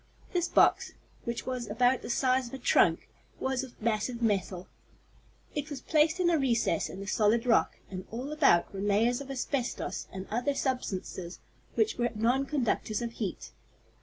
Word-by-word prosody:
This 350 -1 +1
box, - - +3 0.3
which 235 0 -3
was 255 -3 -3
about 245 +4 +2
the - - -7
size 255 0 +2
of 235 - -7
a - - -5
trunk, - - +3 0.3
was 265 0 -1
of 260 -2 -11
massive 230 +2 -1
metal. 195 -5 -1 0.9
It 295 +1 -3
was 285 -3 -5
placed 315 +4 +2
in 350 -1 +3
a 325 - +3
recess 235 - +1
in 190 - -8
the - - -6
solid 220 +3 +2
rock, 235 -2 +3
and 185 0 -6
all 250 +6 -5
about 275 - +3
were 195 - -4
layers 220 +5 +2
of 275 - -9
asbestos 265 -1 -3
and 190 0 -6
other 250 +6 0
substances 190 -9 -3 0.4
that 435 - +1
were 240 0 +2
nonconductors 240 -2 0
of 235 - -3
heat. 215 -4 -5
240 Hz, 165 wpm, -30 LUFS, 215-270 Hz, 0.9 s, box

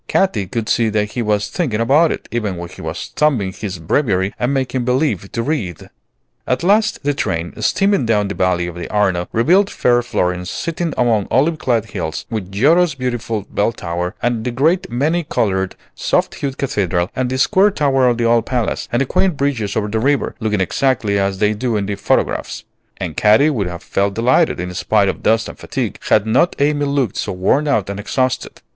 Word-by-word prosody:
Katy 110 - +1
could 115 +2 -3
see 115 -2 +2
that 105 -1 -1
he 125 - -3
was 105 -2 0
thinking 135 -12 -1
about 145 +8 +4
it, - - -5
even 105 -6 -2
when 85 0 -6
he - - -12
was - - -5
thumbing 120 -11 +1
his 95 -3 -5
Breviary 95 - 0
and 125 +2 0
making 130 -2 -1
believe 125 - 0
to 115 - -2
read. 110 - -3 0.6
At 125 - 0
last 210 +1 +2
the 145 +1 +1
train, 85 -10 -2
steaming 195 - +2
down 105 -2 +2
the 100 - -3
valley 90 -2 +1
of 90 - -5
the 85 0 -7
Arno, 95 -4 +1
revealed 180 - +3
fair 120 -1 +2
Florence 90 -6 -1
sitting 165 0 -3
among 115 -5 +2
olive 155 +5 +2
clad 115 -4 0
hills, 80 0 -4
with 100 -4 -4
Giotto's 155 - +3
beautiful 120 -5 -3
Bell 105 +3 0
tower, 90 -3 -4
and 120 -2 0
the 125 - -1
great, 155 +9 +1
many 155 +8 0
colored, 95 -9 -1 0.2
soft - - 0
hued 135 -2 -4
Cathedral, 90 -9 -1
and 130 -1 -1
the 130 - -2
square 190 +9 +4
tower 135 -8 +2
of 120 -1 +2
the 120 - 0
old 115 -1 +2
Palace, 125 -3 -1
and 120 - +1
the - - +2
quaint 180 +4 +1
bridges 125 -8 -1
over 105 -1 0
the 110 +2 -1
river, 140 +4 +1
looking 105 -4 0
exactly 110 -1 +1
as 100 0 0
they 105 +1 +2
do 115 +1 -1
in 100 - -1
the 100 - -2
photographs; 100 - -1 0.3
and - - -5
Katy 110 +9 +4
would 105 -9 -1
have 85 -1 -7
felt 100 0 -1
delighted, 125 - +2
in 90 0 -4
spite 100 +2 +2
of - - -4
dust 115 +1 +2
and - - -10
fatigue, - - -4
had 105 -1 +4
not 110 +10 +2
Amy 145 0 +1
looked 140 -7 0
so - - -2
worn 95 +11 +1
out 110 -9 +1
and 100 0 -5
exhausted. 130 +5 -2
115 Hz, 200 wpm, -18 LUFS, 100-140 Hz, 0.6 s, about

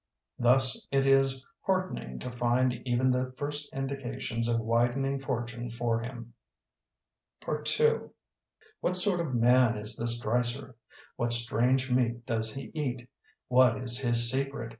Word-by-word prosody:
Thus 125 +1 +3
it 135 -1 +1
is 135 -1 +2 0.2
heartening 185 - -2
to 125 - -5
find 120 +1 +1
even 125 +1 +2
the 125 0 -2
first 145 +1 -5
indications 130 -3 -4
of 115 -1 +1
widening 120 +4 0
fortune 120 -2 -4
for 115 0 -1
him. 120 0 -8 1.1
II 460 0 +2 0.8
What 180 +1 +1
sort 180 -1 +3
of 155 -7 -2
man 120 -1 +4
is 105 0 +1
this 115 0 0
Dreiser? 120 +3 -2 0.4
What 120 0 0
strange 125 +2 +1
meat 120 -1 0
does 110 -1 0
he 135 - -7
eat? 130 -6 -4 0.4
What 125 -2 +4
is 125 -1 0
his 120 -2 +4
secret? 135 -3 -2
125 Hz, 135 wpm, -29 LUFS, 120-135 Hz, 1.1 s, man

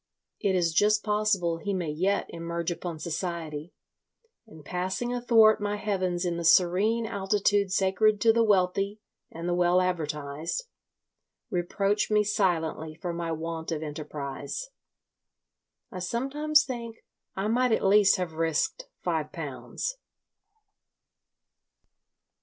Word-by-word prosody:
It 195 -2 +1
is 170 -3 +1
just 210 +4 +3
possible 210 -5 +1
he 200 +4 -3
may 170 -5 -2
yet 190 +6 0
emerge 170 0 -3
upon 175 -1 -5
society, 165 -1 -4 0.8
and, 160 -8 -14
passing 190 +7 -2
athwart 225 -3 +5
my 205 0 -1
heavens 185 -4 -1
in 170 -1 -1
the 170 - -3
serene 195 +7 +4
altitude 200 -1 +1
sacred 195 +3 +2
to 225 -1 +5
the 230 0 +3
wealthy 195 0 +1 0.3
and 165 +1 -6
the 175 - +1
well 175 +1 +3
advertised, 155 - -2 0.9
reproach 195 +4 0
me 210 0 +4
silently 165 -6 0
for 175 +1 -4
my 170 -1 -3
want 160 +1 -4
of 160 -1 -2
enterprise. 150 - -6 1.2
I 185 - -6
sometimes 280 +10 +2
think 235 -3 -7 0.3
I 195 +2 -1
might 245 +2 +2
at 220 - +1
least 200 0 +6
have 180 -4 -3
risked 165 - -1 0.2
five - - -1
pounds. - - -5
185 Hz, 125 wpm, -27 LUFS, 165-210 Hz, 1.2 s, least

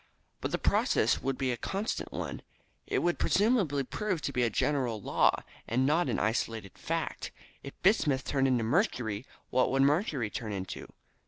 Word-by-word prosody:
"But - - -2
the - - +1
process - - +2
would 135 -1 -1
be 130 -2 0
a 120 - -2
constant 195 - -3
one. - - -4 0.5
It - - 0
would 175 0 +1
presumably 195 - +2
prove 190 +6 -2
to 140 - -2
be 125 - +1
a 120 - +3
general 125 -1 0
law, - - +2 0.2
and 125 +3 +1
not 160 +5 +2
an - - 0
isolated 110 -2 -1
fact. - - -3 0.3
If 140 - -10
bismuth 150 -9 +3
turned 135 -1 +2
into 125 -3 +2
mercury, 120 - 0 0.2
what 125 0 +3
would 135 0 +3
mercury 140 - +1
turn 110 -3 -4
into? 95 -1 -5
135 Hz, 170 wpm, -30 LUFS, 115-165 Hz, 0.5 s, a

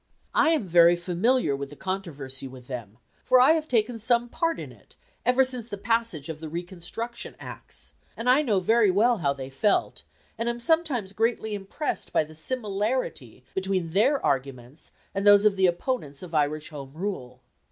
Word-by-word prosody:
I - - +4
am 320 -7 +2
very 175 -1 +6
familiar 180 - +1
with 140 0 -5
the 145 - -11
controversy 145 -8 -5
with 130 -1 -12
them, 115 -5 -7 0.3
for 255 - +5
I 255 +4 +7
have 315 -1 +1
taken 230 -1 +1
some 240 +2 +1
part 330 +6 -1
in - - -7
it - - -20 0.3
ever 255 +1 +5
since 250 -3 -5
the 205 - -5
passage 225 - -1
of 160 -2 -6
the 160 -1 -7
reconstruction 180 +8 -6
Acts, - - -9 0.2
and 230 - -4
I 255 +4 +6
know 220 -10 +2
very 220 +3 +4
well 225 +5 +3
how 140 -4 +1
they 135 -1 -8
felt, 205 +10 +1 0.4
and 230 +1 0
am 235 0 -3
sometimes 255 - 0
greatly 220 0 0
impressed 205 +9 -4
by - - +4
the 155 +1 -13
similarity 205 - -3
between 190 -3 -1
their 265 +9 +3
arguments 135 +1 -3 0.2
and 195 - -2
those 205 0 +7
of 210 -2 +5
the 190 -1 +4
opponents 175 - -2
of 175 -2 -10
Irish 150 0 0
Home 140 -4 -9
Rule. 130 -10 -5
195 Hz, 180 wpm, -26 LUFS, 155-235 Hz, 0.4 s, I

